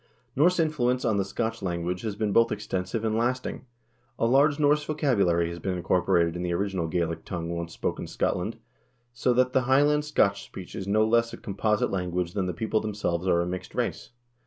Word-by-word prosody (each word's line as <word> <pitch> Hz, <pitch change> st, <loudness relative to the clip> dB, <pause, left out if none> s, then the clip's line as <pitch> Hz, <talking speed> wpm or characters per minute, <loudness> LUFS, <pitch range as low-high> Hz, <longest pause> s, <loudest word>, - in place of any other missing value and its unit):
Norse 175 Hz, +6 st, +4 dB
influence 130 Hz, -6 st, +1 dB
on 110 Hz, -3 st, +2 dB
the 100 Hz, -, +2 dB
Scotch 110 Hz, +4 st, -3 dB
language 90 Hz, -1 st, -2 dB
has 110 Hz, -3 st, -3 dB
been 105 Hz, -1 st, -1 dB
both 115 Hz, +2 st, +4 dB
extensive 100 Hz, +1 st, -3 dB
and 110 Hz, -1 st, 0 dB
lasting. 125 Hz, +3 st, -2 dB, 0.5 s
A -, -, +1 dB
large 140 Hz, +5 st, +4 dB
Norse 150 Hz, 0 st, +3 dB
vocabulary 100 Hz, -, +1 dB
has 85 Hz, 0 st, -7 dB
been 90 Hz, +1 st, -2 dB
incorporated 85 Hz, -1 st, +2 dB
in 90 Hz, -, -4 dB
the 90 Hz, -1 st, -1 dB
original 95 Hz, -2 st, -1 dB
Gaelic 85 Hz, 0 st, -2 dB
tongue 85 Hz, -2 st, -4 dB
once 85 Hz, 0 st, -4 dB
spoken -, -, -3 dB
in -, -, -9 dB
Scotland, -, -, -1 dB, 0.6 s
so 125 Hz, +1 st, +1 dB
that 125 Hz, +1 st, +2 dB
the 130 Hz, -, +4 dB
High 135 Hz, +2 st, +6 dB
land 150 Hz, 0 st, +2 dB
Scotch 100 Hz, -9 st, +1 dB
speech 90 Hz, -2 st, -10 dB
is 95 Hz, -, -5 dB
no 110 Hz, +2 st, +3 dB
less 115 Hz, +1 st, +2 dB
a -, -, -6 dB
composite 105 Hz, +1 st, 0 dB
language 90 Hz, -2 st, -2 dB
than 95 Hz, -2 st, -1 dB
the 90 Hz, -, -2 dB
people 110 Hz, +2 st, 0 dB
themselves 95 Hz, -4 st, -2 dB
are 85 Hz, -2 st, +3 dB
a -, -, -1 dB
mixed 90 Hz, +1 st, -6 dB
race. -, -, -2 dB
100 Hz, 205 wpm, -27 LUFS, 90-125 Hz, 0.6 s, High